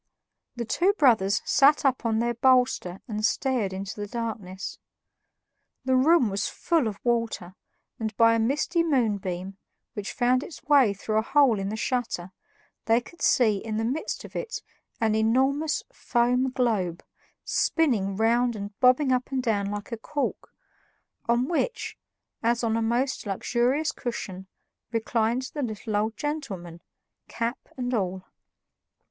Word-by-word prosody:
The 235 Hz, -1 st, -3 dB
two 365 Hz, -, +2 dB
brothers 225 Hz, -, +3 dB
sat 285 Hz, +1 st, +4 dB
up 255 Hz, -3 st, +2 dB
on 220 Hz, -1 st, +1 dB
their 240 Hz, +1 st, +1 dB
bolster 250 Hz, -7 st, +2 dB
and 215 Hz, -2 st, -4 dB
stared 240 Hz, -3 st, +1 dB
into 195 Hz, +2 st, -6 dB
the 205 Hz, -, -3 dB
darkness. 205 Hz, -5 st, -5 dB, 1.1 s
The 260 Hz, 0 st, +3 dB
room 280 Hz, 0 st, +5 dB
was 200 Hz, +2 st, -1 dB
full 325 Hz, -8 st, 0 dB
of 205 Hz, -2 st, -4 dB
water, 230 Hz, -7 st, -1 dB, 0.5 s
and 220 Hz, -2 st, -4 dB
by 230 Hz, 0 st, +6 dB
a 230 Hz, -, +2 dB
misty 300 Hz, +9 st, +1 dB
moonbeam, 200 Hz, -, -1 dB, 0.3 s
which 205 Hz, -1 st, -5 dB
found 250 Hz, +1 st, +2 dB
its 315 Hz, -, -10 dB
way 270 Hz, -8 st, +4 dB
through 215 Hz, +2 st, 0 dB
a -, -, +2 dB
hole 255 Hz, -2 st, +3 dB
in 195 Hz, 0 st, -2 dB
the 215 Hz, -, -3 dB
shutter, 230 Hz, -7 st, -2 dB, 0.5 s
they 225 Hz, +1 st, +4 dB
could 340 Hz, +8 st, -15 dB
see 220 Hz, -5 st, +4 dB
in 215 Hz, +1 st, -4 dB
the 225 Hz, -, 0 dB
midst 270 Hz, +7 st, -3 dB
of -, -, -13 dB
it 485 Hz, -1 st, -4 dB, 0.4 s
an 220 Hz, -2 st, +2 dB
enormous 265 Hz, +8 st, +2 dB
foam 250 Hz, -, +1 dB
globe, 215 Hz, -10 st, -1 dB, 0.4 s
spinning 225 Hz, -, +1 dB
round 235 Hz, +3 st, +2 dB
and 205 Hz, 0 st, -6 dB
bobbing 255 Hz, +2 st, +4 dB
up 255 Hz, 0 st, 0 dB
and 260 Hz, -1 st, -1 dB
down 205 Hz, -4 st, 0 dB
like 205 Hz, +3 st, -5 dB
a 230 Hz, -, -3 dB
cork, 285 Hz, +5 st, -3 dB, 0.8 s
on 240 Hz, +2 st, +2 dB
which, 350 Hz, +9 st, -2 dB, 0.5 s
as 235 Hz, +1 st, +1 dB
on 225 Hz, -1 st, +1 dB
a 230 Hz, -, 0 dB
most 240 Hz, +2 st, 0 dB
luxurious 245 Hz, +9 st, 0 dB
cushion, 190 Hz, -7 st, -6 dB, 0.4 s
reclined 230 Hz, +2 st, 0 dB
the 295 Hz, -, -3 dB
little 215 Hz, -3 st, -3 dB
old 215 Hz, +2 st, 0 dB
gentleman, 195 Hz, -, -5 dB, 0.5 s
cap 230 Hz, +2 st, -4 dB
and 250 Hz, 0 st, -2 dB
all. 190 Hz, -4 st, -1 dB
235 Hz, 150 wpm, -26 LUFS, 210-260 Hz, 1.1 s, by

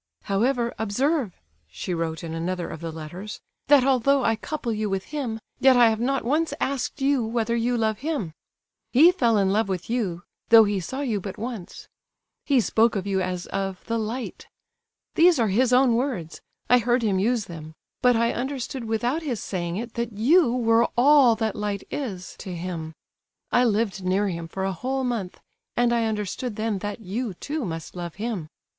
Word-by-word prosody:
"However, 235 Hz, +4 st, 0 dB
observe" 245 Hz, -, 0 dB, 0.3 s
(she 80 Hz, -, -5 dB
wrote 165 Hz, -1 st, -3 dB
in 165 Hz, -1 st, -5 dB
another 175 Hz, +2 st, -2 dB
of 160 Hz, -, -8 dB
the 165 Hz, -1 st, -4 dB
letters), 170 Hz, +6 st, -8 dB, 0.3 s
"that 285 Hz, -2 st, +6 dB
although 270 Hz, +1 st, +3 dB
I 225 Hz, -, +3 dB
couple 240 Hz, 0 st, -4 dB
you 215 Hz, -1 st, -2 dB
with 195 Hz, -1 st, -1 dB
him, 255 Hz, -6 st, -4 dB, 0.2 s
yet 265 Hz, -1 st, +6 dB
I 235 Hz, -2 st, +6 dB
have 220 Hz, -, -2 dB
not 265 Hz, +1 st, 0 dB
once 310 Hz, +6 st, +1 dB
asked 275 Hz, +1 st, -2 dB
you 275 Hz, -3 st, +3 dB
whether 230 Hz, +1 st, -1 dB
you 240 Hz, +1 st, +1 dB
love 220 Hz, -2 st, 0 dB
him. 275 Hz, -, -3 dB, 0.6 s
He 315 Hz, +8 st, +7 dB
fell 235 Hz, -, +2 dB
in 195 Hz, -1 st, +2 dB
love 215 Hz, -1 st, +1 dB
with 185 Hz, +3 st, -3 dB
you, 190 Hz, -8 st, -1 dB, 0.3 s
though 225 Hz, -1 st, +9 dB
he 205 Hz, -2 st, 0 dB
saw 260 Hz, -, -5 dB
you 225 Hz, -8 st, -1 dB
but 195 Hz, 0 st, -6 dB
once. 225 Hz, -5 st, -7 dB, 0.6 s
He 275 Hz, -3 st, +3 dB
spoke 225 Hz, 0 st, +2 dB
of 195 Hz, -2 st, -2 dB
you 195 Hz, -1 st, 0 dB
as 180 Hz, -1 st, -3 dB
of 195 Hz, -1 st, -4 dB
'the 230 Hz, 0 st, -1 dB
light.' 230 Hz, +4 st, -5 dB, 0.7 s
These 340 Hz, 0 st, +5 dB
are 230 Hz, -4 st, +2 dB
his 245 Hz, +6 st, +2 dB
own 250 Hz, -1 st, +5 dB
words—I 240 Hz, -, -1 dB
heard 240 Hz, +1 st, +1 dB
him 200 Hz, -4 st, +1 dB
use 225 Hz, +1 st, +1 dB
them. 160 Hz, -3 st, -9 dB, 0.3 s
But 250 Hz, -1 st, +5 dB
I 235 Hz, +1 st, +2 dB
understood 265 Hz, 0 st, -4 dB
without 240 Hz, +7 st, 0 dB
his 260 Hz, -9 st, -3 dB
saying 175 Hz, -2 st, -3 dB
it 235 Hz, +1 st, -5 dB
that 235 Hz, -1 st, -3 dB
you 255 Hz, -, +4 dB
were 230 Hz, -1 st, +3 dB
all 265 Hz, -2 st, +6 dB
that 220 Hz, -1 st, -2 dB
light 205 Hz, -2 st, -3 dB
is 195 Hz, -11 st, -5 dB
to 185 Hz, -2 st, -6 dB
him. 165 Hz, -2 st, -5 dB, 0.6 s
I 245 Hz, -, +4 dB
lived 210 Hz, -3 st, 0 dB
near 195 Hz, +2 st, +1 dB
him 170 Hz, -2 st, -5 dB
for 190 Hz, +3 st, -5 dB
a 195 Hz, 0 st, -1 dB
whole 260 Hz, +8 st, -2 dB
month, 230 Hz, -8 st, -3 dB, 0.4 s
and 240 Hz, 0 st, +3 dB
I 230 Hz, -1 st, +2 dB
understood 215 Hz, +2 st, -3 dB
then 215 Hz, -2 st, -1 dB
that 205 Hz, +3 st, -5 dB
you, 215 Hz, +1 st, -4 dB
too, 295 Hz, -, -4 dB
must 165 Hz, -2 st, -6 dB
love 175 Hz, -2 st, -6 dB
him. 205 Hz, -6 st, -4 dB
225 Hz, 190 wpm, -25 LUFS, 190-250 Hz, 0.7 s, though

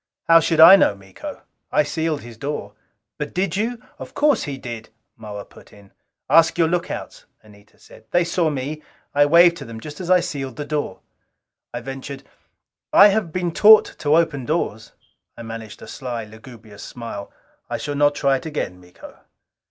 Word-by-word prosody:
"How 165 Hz, 0 st, +6 dB
should 165 Hz, 0 st, 0 dB
I 190 Hz, +5 st, +10 dB
know, 105 Hz, -, +3 dB
Miko? 95 Hz, -1 st, -10 dB, 0.3 s
I -, -, +3 dB
sealed 160 Hz, 0 st, -2 dB
his 120 Hz, -1 st, -11 dB
door." 125 Hz, -5 st, -5 dB, 0.5 s
"But 150 Hz, -, -5 dB
did 185 Hz, -1 st, -1 dB
you?" 230 Hz, +4 st, -2 dB, 0.2 s
"Of -, -, -10 dB
course 295 Hz, -4 st, +2 dB
he 140 Hz, -2 st, -5 dB
did," 120 Hz, -4 st, -8 dB, 0.3 s
Moa 105 Hz, -2 st, -8 dB
put -, -, -18 dB
in. 100 Hz, -1 st, -18 dB, 0.4 s
"Ask 165 Hz, 0 st, +4 dB
your 165 Hz, -2 st, +3 dB
lookouts," 175 Hz, +1 st, -4 dB, 0.2 s
Anita 105 Hz, -1 st, -20 dB
said. 110 Hz, -, -18 dB
"They 175 Hz, -, +2 dB
saw 170 Hz, -1 st, 0 dB
me 145 Hz, +2 st, -4 dB, 0.3 s
I 145 Hz, 0 st, +4 dB
waved 170 Hz, +2 st, +6 dB
to -, -, -9 dB
them 115 Hz, -1 st, -9 dB
just 150 Hz, +5 st, -10 dB
as 180 Hz, -, -6 dB
I 185 Hz, 0 st, +6 dB
sealed 135 Hz, -7 st, -5 dB
the 145 Hz, -, -5 dB
door." 145 Hz, -10 st, -4 dB, 0.7 s
I 120 Hz, -, -5 dB
ventured, 135 Hz, +2 st, -8 dB, 0.7 s
"I 205 Hz, -, +8 dB
have 200 Hz, -5 st, -1 dB
been 175 Hz, 0 st, -2 dB
taught 215 Hz, +5 st, +7 dB
to 150 Hz, +1 st, +2 dB
open 160 Hz, -5 st, 0 dB
doors." 115 Hz, -8 st, -3 dB, 0.4 s
I 115 Hz, -, -8 dB
managed 115 Hz, -2 st, -9 dB
a -, -, -11 dB
sly, 120 Hz, -4 st, -5 dB
lugubrious 110 Hz, -1 st, -14 dB
smile. 115 Hz, -4 st, -8 dB, 0.4 s
"I -, -, -2 dB
shall 145 Hz, -, -4 dB
not 145 Hz, 0 st, +2 dB
try 140 Hz, -1 st, +2 dB
it 130 Hz, -, -8 dB
again, 90 Hz, -12 st, -5 dB
Miko." 90 Hz, 0 st, -15 dB
145 Hz, 180 wpm, -21 LUFS, 115-165 Hz, 0.7 s, I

